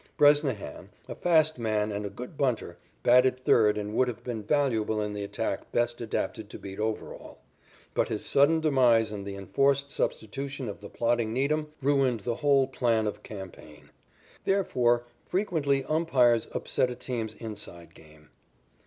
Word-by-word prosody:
Bresnahan, 145 - +2 0.2
a - - -5
fast 155 -5 +2
man 110 -2 0
and 100 0 -3
a - - -6
good 125 +9 -9
bunter 125 -11 -1 0.2
batted 125 +1 +5
third 105 -4 +4
and 105 0 -4
would 130 +3 +3
have 125 - -5
been 120 -3 -4
valuable 110 -3 +1
in 105 -1 -2
the 105 0 -4
attack 100 - -4
best 120 0 0
adapted 110 -1 -3
to - - -8
beat 95 0 -9
Overall. 110 0 -4 0.6
But - - +1
his - - -3
sudden 155 +4 +4
demise 125 -7 +4
and 100 -1 -6
the 100 - -5
enforced 140 +7 +1
substitution 135 +4 -3
of 100 - -6
the 100 0 -10
plodding 115 -1 0
Needham 150 +4 0
ruined 135 -5 +2
the 115 +3 -2
whole 140 -1 +4
plan 120 -4 +1
of 105 - -4
campaign. 95 -7 -11 0.5
Therefore, 120 -11 +2 0.2
frequently 155 -8 0
umpires 130 -8 +3
upset 125 - 0
a 125 - -5
team's 115 -3 -4
"inside" 105 -7 -9
game. 75 -1 -19
120 Hz, 155 wpm, -28 LUFS, 105-140 Hz, 0.6 s, batted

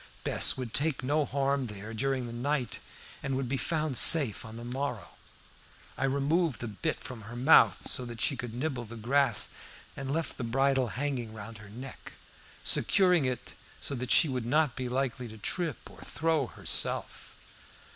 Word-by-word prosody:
Bess - - +4
would 125 -4 -5
take 145 -3 +2
no 145 +3 +1
harm 140 0 0
there 105 +1 -8
during 130 +2 -1
the 120 - -7
night 130 0 -1 0.4
and 135 0 -2
would 135 -2 -2
be 135 - -1
found 155 -1 0
safe 140 -10 +7
enough - - -11
on 110 0 -9
the 120 - -8
morrow. 125 -2 -4 0.9
I 135 - -1
removed 140 - +1
the 120 - -4
bit 115 +10 -3
from 125 -3 -8
her 110 +3 -9
mouth, 130 +6 +5
so 125 - -1
that 120 -1 -8
she 140 - +2
could 120 -2 -6
nibble 130 -2 -3
the 115 +2 -10
grass, 120 0 +2 0.5
and 135 -1 -5
left 160 0 -3
the - - -2
bridle 135 +2 +2
hanging 125 -3 -3
round 110 0 -9
her 105 -1 -12
neck, 125 +5 -9 0.5
securing 180 -6 +3
it 130 -1 -3 0.3
so - - -3
that 125 -2 -4
she 160 - +6
would 125 -4 -3
not 150 0 +2
be 125 -1 -3
likely 130 -1 -2
to 110 0 -11
trip 160 - -3
or - - -14
throw 155 -4 0
herself. - - -3
130 Hz, 180 wpm, -30 LUFS, 120-140 Hz, 0.9 s, safe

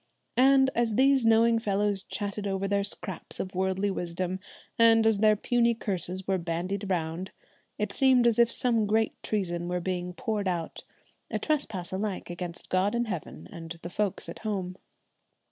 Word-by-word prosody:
And, 265 +1 +5
as 230 -2 +1
these 265 -1 +4
knowing 230 +1 +5
fellows 205 -2 0
chattered 205 0 -4
over 195 0 -1
their 200 0 +1
scraps 195 -2 -6
of 185 - -4
worldly 190 +2 0
wisdom, 180 +1 -3 0.4
and 225 -1 +6
as 220 -2 +3
their 215 0 +5
puny 235 +2 +2
curses 190 -3 -3
were 190 -1 +1
bandied 180 +4 -3
round, 170 +1 -2 0.5
it 210 -1 -1
seemed 260 0 +4
as 235 -1 +3
if 235 -1 +5
some 230 -4 +2
great 220 +1 +2
treason 175 -5 -2
were 180 0 -1
being 180 0 -3
poured 210 +1 -2
out, 170 -3 -3 0.5
a - - -1
trespass 220 - -1
alike 190 -2 -3
against 175 -1 -6
God 190 +4 +1
in 240 0 +1
heaven 145 - -6
and 165 0 -8
the 175 - -6
folks 205 -2 -2
at 170 - -8
home. 190 -4 -3
200 Hz, 165 wpm, -28 LUFS, 180-225 Hz, 0.5 s, and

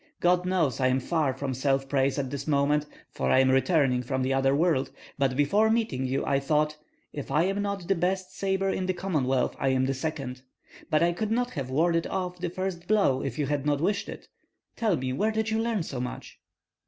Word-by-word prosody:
God 180 +1 +2
knows 165 -10 +1
I 130 - +3
am 130 +1 +2
far 155 +1 0
from 130 0 -4
self 135 +1 0
praise 135 0 +1
at 135 -2 -2
this 140 0 -5
moment, 145 0 +2 0.2
for 65 - -2
I - - +4
am 130 0 +4
returning 135 -2 +3
from 130 +1 -2
the 130 +1 +1
other 135 +1 +2
world; 155 -4 +2 0.3
but 135 -2 +1
before 200 +10 +3
meeting 220 - 0
you 135 +2 -1
I 140 -1 +2
thought, 150 +2 +1 0.4
'If 145 - -6
I 150 +4 +3
am 195 +2 0
not 200 -3 -3
the 195 - +3
best 185 +1 -2
sabre 195 0 0
in 185 -1 -2
the 185 - 0
Commonwealth, 140 -9 0
I 135 - 0
am 130 0 +2
the 135 - 0
second.' 135 -3 -4 0.5
But 155 +1 +3
I 170 - +3
could 215 +4 -2
not 245 +2 0
have 135 -5 -4
warded 165 +4 +1
off 180 -1 -3
the 175 0 -2
first 180 -1 -4
blow 195 -11 +3
if 130 -3 -4
you 150 - 0
had 145 -1 -1
not 145 -1 +1
wished 200 +6 0
it. - - -9 0.5
Tell 215 -7 +1
me 130 0 -2
where 210 +10 +1
did 220 0 -1
you 220 - +1
learn 225 -5 0
so 135 -5 -5
much?" 125 - -7
150 Hz, 225 wpm, -27 LUFS, 135-185 Hz, 0.5 s, I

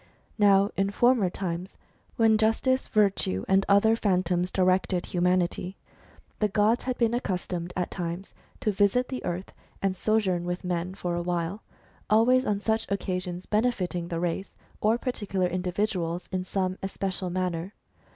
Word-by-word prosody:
Now 200 -1 +5
in 195 +1 +1
former 235 -1 +3
times, 180 0 -5 0.4
when 225 -1 +4
Justice, 225 +4 +2
Virtue, 195 - +1
and 190 0 +4
the 195 - -2
other 220 +3 +5
Phan 190 -5 +1
toms 180 +1 0
directed 185 -1 +1
humanity, 180 +1 0 0.6
the 210 - +3
gods 210 +3 +2
had 255 -1 -1
been 230 -1 +2
accustomed 180 -6 -2
at 180 - -2
times 175 +1 -5 0.3
to 215 - +1
visit 205 +5 +2
the 255 - -4
earth, 180 +2 -4 0.3
and 195 -1 0
sojourn 190 -4 +1
with 175 +1 -3
men 180 +1 -2
for 175 -3 -3
awhile, 175 +3 -2 0.5
always 250 +4 +4
on 205 -1 +1
such 220 +2 0
occasions 180 -2 -3
benefiting 205 -6 0
the 170 -1 -3
race, 175 +3 -3 0.3
or 220 +2 +3
particular 205 -7 -1
individuals, 180 -1 -1
in 185 -1 -2
some 185 -1 -2
especial 190 -1 -3
manner. 180 +1 -2
190 Hz, 150 wpm, -27 LUFS, 180-215 Hz, 0.6 s, Now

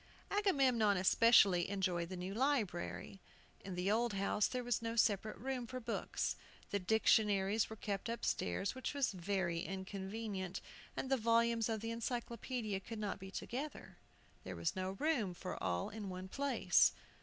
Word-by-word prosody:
Agamemnon 265 - +3
especially 190 -2 +5
enjoyed 180 -4 0
the 185 - -5
new 180 +2 -4
library. 215 -7 -1 0.4
In 190 -2 -5
the 180 +3 +1
old 235 +1 +2
house 200 +1 +2
there 250 -1 -3
was 240 -2 0
no 230 0 -3
separate 215 -2 +2
room 250 +2 -3
for 255 +1 -5
books. 235 - -2 0.4
The 200 - +1
dictionaries 210 0 +3
were 220 - -6
kept 205 0 -3
upstairs, 200 - -1
which 260 +2 -4
was 280 -2 +2
very 185 -2 -1
inconvenient, 195 +1 -4 0.4
and 265 - -3
the 270 - +4
volumes 230 0 +3
of 220 -2 -1
the 225 0 -3
Encyclopædia 230 -3 -3
could 230 - -6
not 210 -2 -3
be 190 0 -8
together. 245 -4 -6 0.4
There 95 -1 -6
was 85 0 -1
not 190 +1 -3
room 260 - +1
for 180 +1 -6
all 90 0 0
in 210 -2 -5
one 185 0 -6
place. 280 +4 +3
210 Hz, 155 wpm, -37 LUFS, 190-235 Hz, 0.4 s, especially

